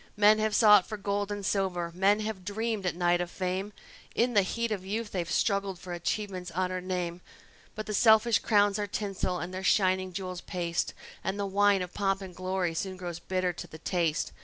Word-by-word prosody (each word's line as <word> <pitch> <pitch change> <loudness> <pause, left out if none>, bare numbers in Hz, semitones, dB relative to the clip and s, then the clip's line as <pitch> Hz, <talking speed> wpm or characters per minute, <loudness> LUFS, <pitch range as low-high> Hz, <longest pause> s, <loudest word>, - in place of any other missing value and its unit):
Men 210 +1 +6
have 215 -1 +1
sought 210 -4 +7
for 215 - -5
gold 205 0 -2
and 205 -1 -4
silver; 180 -4 0
men 200 +4 +3
have 215 -3 -4
dreamed 215 0 -2
at 175 - -1
night 175 0 +2
of 175 - -3
fame; 185 +2 -3 0.4
In 240 +1 +2
the 205 - +6
heat 230 +4 -2
of 200 -3 -2
youth 210 +3 -3
they've 175 -3 -2
struggled 200 -2 0
for 180 0 -7
achievement's 185 +1 -3
honored 185 +1 -2
name; 180 -1 -3 0.5
But 215 0 -4
the 215 - -4
selfish 220 +1 +5
crowns 205 -1 +3
are 205 - -1
tinsel, 195 -3 -2
and 175 +1 -5
their 185 - -4
shining 185 -1 +2
jewels 185 -1 -5
paste, 170 -2 -2 0.3
And 195 +2 -2
the 200 - 0
wine 200 0 +3
of 180 - -8
pomp 195 -1 0
and 185 -2 -9
glory 185 -2 -1
soon 185 +3 -3
grows 175 -2 -5
bitter 185 0 -1
to - - -8
the 160 - -11
taste. 165 -1 -1
190 Hz, 205 wpm, -29 LUFS, 180-205 Hz, 0.5 s, sought